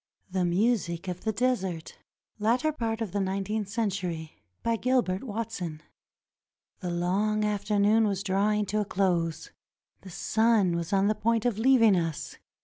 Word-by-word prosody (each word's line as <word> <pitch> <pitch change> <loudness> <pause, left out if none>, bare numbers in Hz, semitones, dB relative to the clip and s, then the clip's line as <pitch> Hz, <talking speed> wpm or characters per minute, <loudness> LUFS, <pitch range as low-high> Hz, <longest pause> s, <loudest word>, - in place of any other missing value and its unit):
THE 185 -1 +1
MUSIC 180 -2 0
OF 180 -1 -4
THE 220 - +2
DESERT 195 -8 -2 0.4
[Latter 240 +9 +2
part 230 -6 -3
of 215 -6 -3
nineteenth 200 +1 -2
century] 185 -7 -3 0.2
BY 230 0 +1
GILBERT 240 -6 +1
WATSON 205 -9 -5 1.0
The 180 - -4
long 200 +5 0
afternoon 210 +1 +2
was 200 -1 -2
drawing 205 +2 +1
to 210 +2 0
a - - -2
close. 175 -5 -1 0.5
The 190 - -11
sun 215 -1 +2
was 170 -1 -3
on 195 0 +3
the 210 - +3
point 230 +2 0
of 230 -4 0
leaving 230 -4 +5
us. 165 -3 -3
205 Hz, 140 wpm, -28 LUFS, 180-225 Hz, 1.0 s, leaving